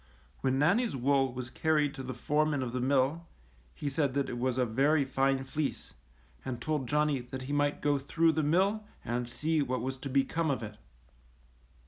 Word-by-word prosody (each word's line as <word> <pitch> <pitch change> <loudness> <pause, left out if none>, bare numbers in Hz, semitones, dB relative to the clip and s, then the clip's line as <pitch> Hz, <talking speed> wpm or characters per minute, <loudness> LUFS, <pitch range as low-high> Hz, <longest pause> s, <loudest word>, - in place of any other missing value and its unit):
When 130 0 +1
Nannie's 195 - +2
wool 135 0 +2
was 120 0 -6
carried 150 -2 +1
to 140 - -7
the 130 -1 -5
foreman 150 +1 +1
of 120 - -3
the 125 - -2
mill, 140 +5 +1 0.5
he 145 - -5
said 140 -1 0
that 140 -1 0
it 120 - -4
was 130 0 0
a 125 - +3
very 140 +6 +2
fine 135 0 +1
fieece, 140 +2 -3 0.5
and 125 -2 -4
told 145 0 -2
Johnny 150 -1 +2
that 130 +1 -7
he 140 +3 -4
might 145 0 0
go 145 -1 +2
through 160 +4 +2
the 160 0 0
mill 190 +8 +2 0.2
and 120 +1 -2
see 155 +5 0
what 130 -3 -1
was 130 +2 -3
to 135 +1 -6
become 140 +5 +1
of 130 -4 -1
it. 105 -1 -7
135 Hz, 190 wpm, -30 LUFS, 130-150 Hz, 0.5 s, a